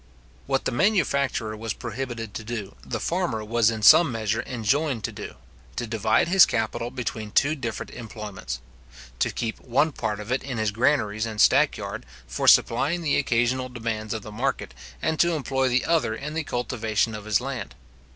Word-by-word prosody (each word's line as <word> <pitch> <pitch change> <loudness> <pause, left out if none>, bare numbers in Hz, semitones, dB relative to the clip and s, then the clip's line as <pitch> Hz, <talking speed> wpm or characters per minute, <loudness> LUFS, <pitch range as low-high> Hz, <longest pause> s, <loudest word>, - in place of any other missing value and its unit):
What - - 0
the - - 0
manufacturer 140 - +1
was 110 0 -4
prohibited 120 -2 -5
to - - -5
do, 110 -3 -5
the - - -4
farmer 170 -12 -1
was 115 0 +3
in 110 -1 -4
some 165 +6 +8
measure 110 0 -1
enjoined 130 +1 0
to - - -2
do; - - -8 0.4
to 120 - -2
divide 110 +2 +1
his 190 +1 +7
capital 115 +1 0
between 110 -3 -4
two 140 +8 +3
different 120 -7 -5
employments; 105 - -7 0.6
to - - +2
keep 115 -1 -4
one 140 +6 +1
part 110 -6 -3
of 105 +3 -7
it 130 - +1
in 130 -3 -5
his 110 -1 0
granaries 110 -2 +1
and 110 -1 -6
stack - - +5
yard, - - -6 0.2
for - - -3
supplying 150 +9 +4
the 150 - +2
occasional 130 0 +1
demands 115 -3 -3
of 110 - -5
the 110 - -9
market, 130 +6 -2 0.3
and 160 - 0
to 170 0 +4
employ 135 -3 0
the 125 +1 +1
other 160 -9 +1
in 150 +5 -6
the 160 0 -1
cultivation 115 -4 -1
of 105 -1 -7
his 105 -1 +2
land. 130 0 -5
120 Hz, 180 wpm, -25 LUFS, 110-135 Hz, 0.6 s, some